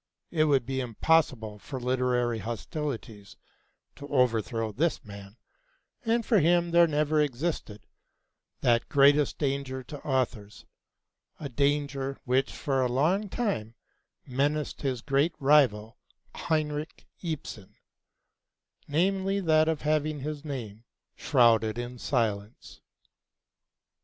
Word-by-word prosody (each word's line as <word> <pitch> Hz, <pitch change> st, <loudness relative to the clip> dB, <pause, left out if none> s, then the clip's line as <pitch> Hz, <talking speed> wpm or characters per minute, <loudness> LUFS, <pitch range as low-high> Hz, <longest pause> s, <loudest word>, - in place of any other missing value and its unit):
It 155 Hz, -2 st, +2 dB
would 135 Hz, -5 st, +2 dB
be 135 Hz, +1 st, -2 dB
impossible 120 Hz, -3 st, +1 dB
for 130 Hz, +6 st, -7 dB
literary 125 Hz, -2 st, 0 dB
hostilities 115 Hz, -, -6 dB, 0.6 s
to 140 Hz, -, -9 dB
overthrow 115 Hz, -5 st, +1 dB
this 150 Hz, +4 st, -1 dB
man, 100 Hz, +1 st, -11 dB, 0.7 s
and 230 Hz, 0 st, +1 dB
for 220 Hz, -5 st, +4 dB
him 170 Hz, +1 st, +3 dB
there 170 Hz, 0 st, +6 dB
never 150 Hz, 0 st, +1 dB
existed 140 Hz, -6 st, -3 dB, 0.8 s
that 120 Hz, -1 st, +2 dB
greatest 145 Hz, 0 st, +4 dB
danger 135 Hz, -2 st, -2 dB
to 145 Hz, +3 st, -9 dB
authors 120 Hz, -7 st, -2 dB, 0.7 s
(a 145 Hz, -, -5 dB
danger 140 Hz, 0 st, -1 dB
which 130 Hz, +1 st, +1 dB
for 135 Hz, -3 st, -1 dB
a 125 Hz, -, +1 dB
long 175 Hz, +11 st, +1 dB
time 150 Hz, -, -2 dB, 0.5 s
menaced 145 Hz, +3 st, -1 dB
his 130 Hz, -4 st, -2 dB
great 145 Hz, +5 st, +1 dB
rival 130 Hz, -7 st, +3 dB, 0.3 s
Henrik 155 Hz, -1 st, -2 dB, 0.2 s
Ibsen), 125 Hz, -, -6 dB, 1.1 s
namely, 195 Hz, +5 st, +1 dB
that 155 Hz, -4 st, +3 dB
of 160 Hz, -2 st, -1 dB
having 155 Hz, -1 st, 0 dB
his 150 Hz, +1 st, -5 dB
name 115 Hz, -8 st, -6 dB, 0.3 s
shrouded 115 Hz, -5 st, +3 dB
in 120 Hz, 0 st, -6 dB
silence. 110 Hz, -6 st, -2 dB
140 Hz, 110 wpm, -28 LUFS, 120-155 Hz, 1.1 s, there